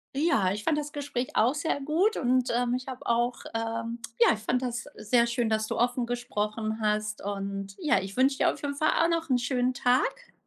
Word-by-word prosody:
Ja, 275 - +2
ich 210 +2 -4
fand 305 +4 +1
das 295 0 -3
Gespräch 280 -4 -3
auch 235 +5 +4
sehr 295 0 -1
gut 340 +10 +1
und, 255 -1 +2
ähm, 245 0 +1
ich 255 +1 -3
habe 255 -1 -7
auch, 240 +1 +1 0.2
ähm 230 +1 -3 0.2
ja, 235 - +6
ich 215 - -5
fand 245 +4 0
das 245 -1 -3
sehr 235 +2 +2
schön, 235 -1 0
dass 220 0 0
du - - -3
offen 245 0 +1
gesprochen 220 -2 -2
hast. 210 0 -1
Und 195 -1 -4
ja, 310 - +3
ich 195 +1 -7
wünsche 270 +1 +3
dir - - +3
auf - - -10
jeden 285 -1 -3
Fall 310 +2 +2
auch 335 - +3
noch 330 -1 -1
'n 255 - +4
schönen 250 0 0
Tag 255 - 0
245 Hz, 220 wpm, -28 LUFS, 220-270 Hz, 0.2 s, ja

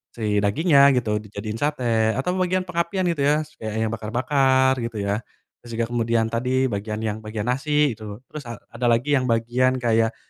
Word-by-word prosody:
si 105 -3 0
dagingnya 140 - +3 0.2
gitu 110 -4 0
dijadiin 105 +1 -6
sate 120 -7 +1
atau 135 +8 -1
bagian 185 0 +1
pengapian 180 +1 -1
gitu 165 - -5
ya 150 +1 +2
setidaknya 110 -7 -4
bakar-bakar 130 +4 +2
gitu 115 -1 -4
ya, 100 +1 0 0.4
terus 120 - -14
juga 115 0 0
kemudian 115 -1 0
tadi 130 +2 0
bagian 105 +2 -4
yang 110 -1 -2
bagian 110 -1 -5
nasi 145 +2 +1
gitu 110 +1 -9
terus 145 -5 -8
a 115 - -5 0.2
ada 125 - -1
lagi 120 +5 +2
yang 130 - -2
bagian 120 +2 +1
kayak, 115 -2 +1
120 Hz, 175 wpm, -23 LUFS, 110-135 Hz, 0.4 s, dagingnya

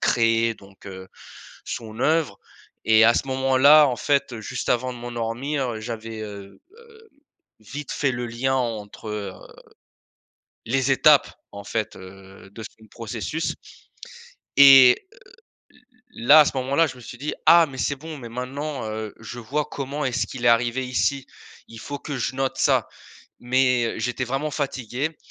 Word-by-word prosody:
créait, 115 -1 +2
donc 100 -1 -18
heu, 95 -1 -9 0.6
son 110 0 -7
œuvre 160 +3 +1 0.5
et 110 0 +5
à 115 - +5
ce - - -1
moment-là, 135 +3 +5
en 125 - -1
fait, 140 -1 0
heu, 110 - -7
juste - - -5
avant 125 +1 0
de 125 - -10
m'endormir, 120 +3 -3
heu, 110 - -6
j'avais, 115 0 -7
heu 100 -2 -10 0.2
heu, 450 -1 -19 0.5
vite 145 +7 -8
fait 140 -2 0
le 120 0 -4
lien 120 +3 -1
entre, 110 -3 -4
heu, 105 -3 -5 1.3
les 135 +3 0
étapes, 145 +2 +5 0.2
en 100 0 -9
fait, 105 +1 -3
heu, 95 +1 -14
de 110 +2 -10 0.2
son 110 - -17
processus 115 +8 -4 1.0
et 135 -3 +9 0.2
heu, - - -20 0.6
l - - -24 0.4
l 115 - -7
là, 155 +2 +9
à 150 - +4
ce 135 - -2
moment-là, 140 +5 +1
je 130 - -9
me - - -13
suis 120 - -10
dit: 145 +4 -4
«Ah! 170 0 +7
Mais 130 - -10
c'est 140 +2 -1
bon, 155 +2 -9
mais 125 -4 -9
maintenant, 130 +2 -5
heu, 110 -1 -5
je 120 +2 -8
vois 140 +6 -2
comment 140 +2 -5
est-ce 130 -2 -1
qu'il 125 -3 -8
est - - +6
arrivé 120 +2 +1
ici, 135 +1 -1 0.4
il 115 - -11
faut 145 +4 -7
que 145 -3 -6
je 125 +2 -3
note 135 -1 -2
ça». - - +2 0.5
Mais, 125 -1 +2
heu, - - -7
j'étais 125 +2 -3
vraiment 135 +5 -3
fatigué 140 +1 -3
125 Hz, 170 wpm, -23 LUFS, 115-140 Hz, 1.3 s, et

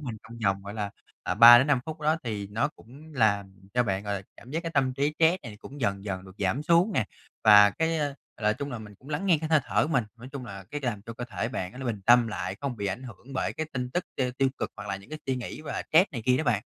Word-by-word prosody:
mình 115 -3 -4
trong 115 +1 -11
vòng, 95 0 +1
gọi 100 +1 -7
là, 105 -2 -3 0.3
à, - - -1
3-5 120 +4 +8
phút 160 0 -6
đó, 155 +1 +2
thì 105 -3 -3
nó 110 +8 0
cũng 150 +3 -15
làm 100 -5 +2 0.2
cho 125 - +4
bạn, 100 -4 -1
gọi 100 0 -1
là, 95 - -4
cảm 120 - -14
giác 165 +4 -2
cái 165 - -3
tâm 130 -2 +2
trí 145 +3 0
stress 165 +3 +4
này 110 -3 -9
cũng 140 +1 -10
dần 100 -4 -1
dần 95 -2 -4
được 95 0 -13
giảm 100 +9 0
xuống 170 +6 +3
nè. 110 - +1 0.4
Và 105 -1 +9
cái, 160 +6 0
a, 145 -2 -1 0.2
là 105 -1 +2
chung 140 +6 -5
là 120 - -4
mình 105 -2 -11
cũng 130 +8 -17
lắng 155 +6 -2
nghe 170 -5 +4
cái 155 +1 -4
hơi 155 -2 +4
thở - - +1
của - - -6
mình, 125 -4 +2
nói 120 +2 -10
chung 140 -3 -6
là 100 -2 -8
cái 145 - -4
làm 120 -7 -3
cho 115 +1 -8
cơ 120 +1 -6
thể 115 -1 -3
bạn 95 -7 -4
nó - - -11
nó 130 - -5
bình 110 -4 -2
tâm 120 0 +7
lại, 95 -2 -4
không 140 -4 -3
bị 100 -2 -3
ảnh 100 +6 -3
hưởng 125 +2 -11
bởi 130 - -1
cái 160 - -4
tin 125 -1 -3
tức 180 +6 -1
t 135 - 0 0.2
tiêu 135 -1 +4
cực - - -2
hoặc 105 0 -8
là 95 - -1
những 100 +8 -15
cái 155 - -5
suy 130 -1 0
nghĩ 125 +4 -6
và 155 - -4
stress 170 +3 +5
này 115 -4 -4
kia 125 0 +5
đó 155 - -1
bạn. 115 -5 +1
120 Hz, 295 wpm, -27 LUFS, 105-145 Hz, 0.4 s, Và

